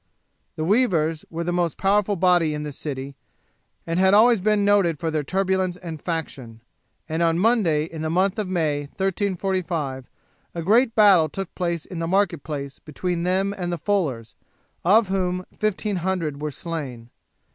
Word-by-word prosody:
The 155 - -3
weavers 165 -7 +1
were 170 0 -4
the 175 +1 -2
most 175 -2 0
powerful 205 +1 +2
body 175 -4 +3
in 150 - -4
this 145 -2 -6
city, 140 -2 -5 0.7
and 165 +1 -1
had 190 +1 +5
always 225 -1 +5
been 210 0 +2
noted 200 -6 +3
for 165 -2 -2
their 155 -1 0
turbulence 190 +2 0
and 165 -4 -8
faction; 130 -9 -5 0.4
and 160 +1 -2
on 165 -1 +3
a - - 0
Monday 190 -8 +2
in 160 -1 -8
the 160 - -2
month 190 +5 +1
of 210 - -2
May, 160 -5 0 0.2
1345, 185 -8 -2 0.5
a 170 - -3
great 225 +6 +3
battle 195 -7 +6
took 195 +3 -6
place 170 -3 -2
in 180 - -7
the 165 - -2
market 190 -3 +1
place 140 -3 -6
between 170 +3 -3
them 190 +3 0
and 175 -2 -3
the 175 - -2
fullers, 150 - -1 0.5
of 205 +3 +4
whom 185 -1 -1
1500 185 -7 -1
were 150 - -2
slain. 135 -7 -6
175 Hz, 170 wpm, -23 LUFS, 155-195 Hz, 0.7 s, battle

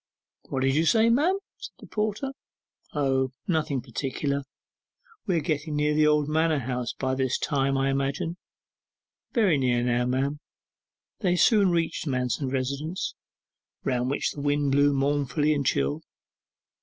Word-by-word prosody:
'What 130 - -1
did 135 0 +2
you 160 +3 +2
say, 225 +3 +5
ma'am?' 320 +11 +3 0.2
said - - -9
the - - -13
porter. 215 +5 -2 0.6
'O, 135 -2 +1
nothing 155 -6 0
particular; 140 +3 -2 0.9
we 185 - +2
are - - +1
getting 150 0 -2
near 150 0 +2
the 155 0 +4
old 150 -1 +3
manor 160 0 +2
house 125 -2 -2
by 130 -1 -2
this 130 -1 0
time, 135 -2 0
I 135 0 +1
imagine?' 140 +5 -1 1.0
'Very 200 - +3
near 120 -2 +1
now, 125 0 +1
ma'am.' 135 +3 0 0.8
They 180 -4 +2
soon 205 +1 +5
reached 165 -2 -1
Manston's 130 0 -1
residence, 140 +6 -2 0.7
round 125 -1 0
which 140 - 0
the 145 - -7
wind 145 -1 +1
blew 145 +1 +4
mournfully 145 +1 +1
and 145 -1 0
chill. 70 - 0
145 Hz, 145 wpm, -26 LUFS, 130-160 Hz, 1.0 s, say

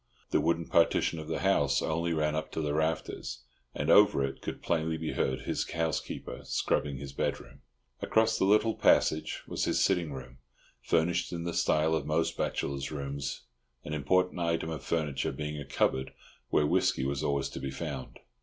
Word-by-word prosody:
The - - +3
wooden 85 0 +1
partition 85 0 +2
of 80 - -7
the 80 - -2
house 70 -9 +3
only 85 +2 -1
ran 75 -1 +1
up 80 - -3
to - - -1
the 75 -1 -1
rafters, 80 -5 -2 0.3
and - - +1
over 70 - +6
it 70 0 -4
could - - -6
plainly 80 -1 0
be 80 -1 -3
heard 65 -1 -1
his - - -2
housekeeper 80 -1 -3
scrubbing 70 -2 0
his 70 0 -7
bedroom. - - -3 0.4
Across 110 0 +2
the - - +3
little 105 +3 +4
passage 80 -6 +2
was - - -2
his - - +1
sitting 85 -4 +2
room, 65 -2 -9 0.4
furnished 85 +2 +1
in 85 -1 -4
the 85 0 -3
style 80 0 +2
of 80 -3 -1
most 80 +2 +1
bachelors' 70 -1 -2
rooms, 70 -1 -4 0.4
an 75 - -4
important 90 +5 +1
item 85 -1 0
of 75 -4 -5
furniture 75 -3 -1
being 75 +2 -4
a - - -7
cupboard 65 -1 0 0.4
where 75 - +3
whisky 65 -2 +2
was 70 0 -1
always 70 -1 0
to - - -7
be 70 - -4
found. 65 -1 -6
80 Hz, 180 wpm, -30 LUFS, 70-85 Hz, 0.4 s, over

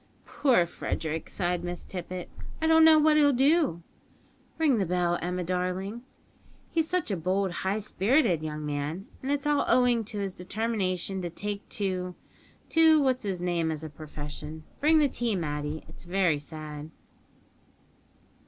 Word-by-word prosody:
"Poor 245 -11 +3
Frederick," 160 -1 -4
sighed 175 -2 -1
Miss 175 -1 -4
Tippet, 180 -1 -6 0.3
"I 320 - -1
don't 320 0 +6
know 320 -1 +8
what 305 0 +5
he'll 290 -1 +6
do 275 - +2 0.7
(ring 295 -8 +3
the 195 - +1
bell, 175 0 +1
Emma, 180 +1 -2
darling); 185 +5 -2 0.7
he's 325 -1 +1
such 360 -10 0
a - - +1
bold, 185 +3 0
high 190 +4 -1
spirited 210 - +2
young 155 -1 -4
man, 150 +6 -3 0.2
and 265 - -2
it's 285 0 -1
all 295 -1 +3
owing 245 -2 +4
to 210 0 -6
his 195 -2 -2
determination 190 -1 -2
to 175 - -3
take 205 +4 -5
to 185 -3 -2 0.5
to 320 -1 +6
what's 260 -5 +1
'is 190 -3 -2
name 175 -2 0
as 155 0 -4
a 155 - -6
profession 150 +1 -8 0.2
(bring 315 +2 +5
the 300 -2 +5
tea, 240 -4 -1
Matty). 150 -2 -3
It's 160 - -11
very 175 -4 +2
sad." 150 0 -7
185 Hz, 155 wpm, -28 LUFS, 170-250 Hz, 0.7 s, know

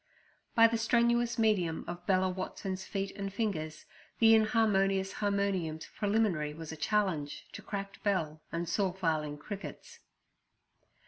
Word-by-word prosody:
By 230 - +8
the 230 0 +3
strenuous 235 +1 +2
medium 195 -8 +1
of 175 +1 -7
Bella 190 -1 +3
Watson's 185 0 -4
feet 195 -1 -3
and 200 -1 -4
fingers, 175 -8 -3 0.3
the 225 -1 +7
inharmonious 200 -4 +3
harmonium's 200 -6 -1
preliminary 200 -8 +1
was 160 -1 -7
a - - -5
challenge 170 -5 -1
to - - -8
cracked 200 -1 -6
bell 165 -7 0
and 170 +1 -2
saw 190 +2 +1
filing 155 -5 -1
crickets. 210 - -8
195 Hz, 130 wpm, -31 LUFS, 165-215 Hz, 0.3 s, By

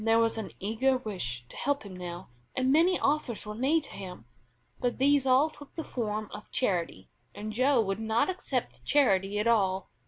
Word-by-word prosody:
There 225 0 +4
was 230 0 +2
an 220 - -5
eager 235 +6 +1
wish 155 - -4
to - - -12
help 285 -1 0
him 200 -3 -9
now, 175 0 -7 0.3
and 260 0 +2
many 340 +5 +4
offers 280 -7 0
were 210 - -5
made 275 +8 +2
to - - -11
him; 185 -2 -8 0.5
but 245 -1 -1
these 275 0 +3
all 265 +5 +4
took 290 -2 -14
the 325 - -3
form 215 -5 -3
of 210 - -9
charity, 175 - -1 0.2
and 215 +1 -5
Joe 255 +3 +3
would 195 -1 -2
not 220 +1 +1
accept 325 -9 -3
charity 200 -8 +3
at 210 - 0
all. 195 -5 +2
225 Hz, 190 wpm, -29 LUFS, 200-270 Hz, 0.5 s, There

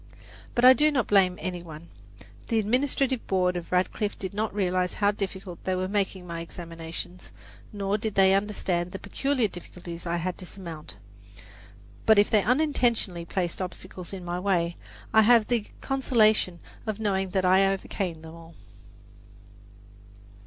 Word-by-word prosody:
But 245 - +4
I 255 - +11
do 300 +5 +4
not 260 -7 +1
blame 185 -3 +3
any 180 -1 -4
one. 165 0 -11 0.6
The 230 - +1
administrative 255 +3 +1
board 180 -1 +2
of 175 -1 -5
Radcliffe 185 +3 0
did 190 +1 -5
not 215 +1 -1
realize 185 -2 0
how 205 -1 +3
difficult 190 -3 -6
they 185 - 0
were 185 0 -1
making 195 -2 -1
my 170 -1 -5
examinations, 165 +1 -8 0.4
nor 205 0 -1
did 215 -1 -3
they 190 0 +6
understand 190 -3 -1
the - - -3
peculiar 255 +5 0
difficulties 175 -2 -9
I 170 +1 0
had 180 +1 -3
to 185 - -7
surmount. 170 -6 -8 1.1
But 220 -1 +7
if 205 - +4
they 215 - +5
unintentionally 240 - +1
placed 175 +1 -2
obstacles 185 0 -6
in 190 -2 -7
my 175 +1 -2
way, 175 -3 +1 0.4
I 220 - +7
have 230 0 +5
the 235 -4 0
consolation 220 -9 +2 0.3
of 215 -1 -2
knowing 195 -3 0
that 185 0 0
I 190 +1 +5
overcame 185 -4 -4
them 160 0 -10
all. 165 0 -13
190 Hz, 155 wpm, -27 LUFS, 175-215 Hz, 1.1 s, I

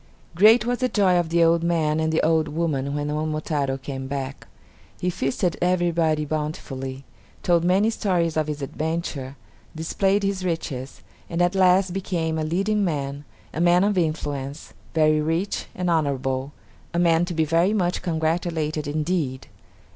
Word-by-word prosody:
Great 215 +6 +6
was 245 0 0
the 255 -1 +1
joy 185 -5 +3
of 170 -2 -1
the 170 0 +3
old 165 0 +4
man 160 -2 +1
and 160 0 +1
the 160 - +2
old 160 -1 +2
woman 145 -3 -1
when 145 0 -2
Momotaro 150 -2 -1
came 135 0 -6
back. 135 0 -5 0.5
He 180 - 0
feasted 165 +4 -1
everybody 170 -4 +1
bountifully, 140 -3 -4 0.4
told 170 -2 +3
many 195 +5 +3
stories 175 -7 0
of 155 -1 0
his 150 -2 -4
adventure, 150 -3 -3 0.4
displayed 195 +5 +1
his 195 -1 -1
riches, 145 -7 -4 0.3
and 170 - -3
at 175 +1 +3
last 185 -1 +4
became 170 -4 -2
a - - -1
leading 195 +6 0
man, 145 -4 -2 0.3
a 160 - -2
man 175 +1 +5
of 205 0 +2
influence, 150 -4 -3 0.2
very 155 -1 +4
rich 165 +6 -1
and 180 0 -2
honorable; 140 -4 0 0.4
a - - +1
man 170 -1 +4
to 175 -1 -5
be 160 0 +2
very 165 +5 +2
much 180 -4 0
congratulated 160 -2 -1
indeed!! 150 -3 -1
160 Hz, 155 wpm, -24 LUFS, 150-180 Hz, 0.5 s, Great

